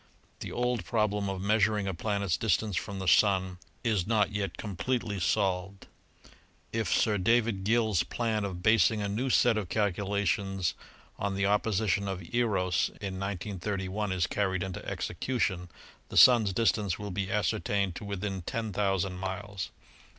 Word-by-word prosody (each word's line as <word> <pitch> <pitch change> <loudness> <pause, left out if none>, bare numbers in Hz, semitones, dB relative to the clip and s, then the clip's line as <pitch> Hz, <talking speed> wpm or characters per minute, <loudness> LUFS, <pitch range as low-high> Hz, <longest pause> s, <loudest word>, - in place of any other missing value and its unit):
The - - -6
old 125 -4 -1
problem 105 +2 0
of 95 -1 -4
measuring 105 0 +2
a 95 - -1
planet's 100 -1 -1
distance 105 -1 0
from 100 +2 -3
the 95 -1 -4
Sun 95 -2 +3 0.2
its 105 -7 +1
not 105 -2 +2
yet 100 -3 -3
completely 105 +1 -2
solved. 95 +1 0 0.9
If 115 -1 -1
Sir 105 -2 +2
David 115 -1 +2
Gill's 110 -3 +2
plan 110 -3 -1
of 90 -3 -5
basing 110 -1 +4
a - - -1
new 115 +7 -1
set 120 -2 +4
of 95 -5 -6
calculations 100 -2 0 0.5
on 100 -1 -1
the 100 0 +1
opposition 100 -1 +1
of 95 -2 -4
Eros 100 -8 +1
in 95 -2 -5
193 100 0 -3
1 105 +1 -2
is 90 -3 +1
carried 95 0 -1
into 95 -1 -5
execution, 90 -3 -2 0.4
the - - -4
Sun's 115 -6 +7
distance 105 -3 +1
will 105 -1 -6
be 95 +1 -2
ascertained 100 -2 0
to - - -8
within 100 -1 -3
10,000 95 -2 -1
miles. 95 +1 -4
100 Hz, 150 wpm, -29 LUFS, 95-110 Hz, 0.9 s, Sun's